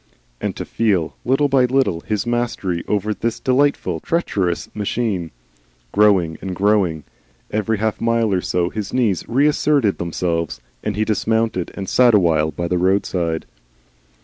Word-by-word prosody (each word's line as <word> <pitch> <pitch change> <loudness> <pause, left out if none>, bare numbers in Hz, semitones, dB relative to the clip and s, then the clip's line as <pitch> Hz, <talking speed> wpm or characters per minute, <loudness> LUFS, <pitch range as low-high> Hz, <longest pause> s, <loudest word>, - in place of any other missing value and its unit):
And - - -2
to - - -5
feel, 100 -8 0
little 135 +4 +2
by 135 -2 +3
little, 130 -9 +1
his 105 +1 -2
mastery 120 -7 -1
over 105 +1 0
this 115 +2 -3
delightful, 140 +2 +1
treacherous 100 - -1
machine, 105 -4 -2 0.6
growing 95 -6 +3
and 95 -2 -4
growing! 95 -6 +1 0.5
Every 110 +1 0
half 110 +1 -2
mile 115 -2 +2
or 90 - +1
so 90 -1 -1
his 105 -3 -5
knees 110 -8 +1
reasserted 140 -3 +2
themselves, 85 -1 -2 0.2
and 105 -2 -2
he 110 +1 0
dismounted 110 -3 0
and 95 -1 -5
sat 120 +1 +5
awhile 80 -5 +3
by 85 +3 -4
the 90 +1 0
roadside. 90 -3 0
105 Hz, 145 wpm, -20 LUFS, 90-115 Hz, 0.6 s, sat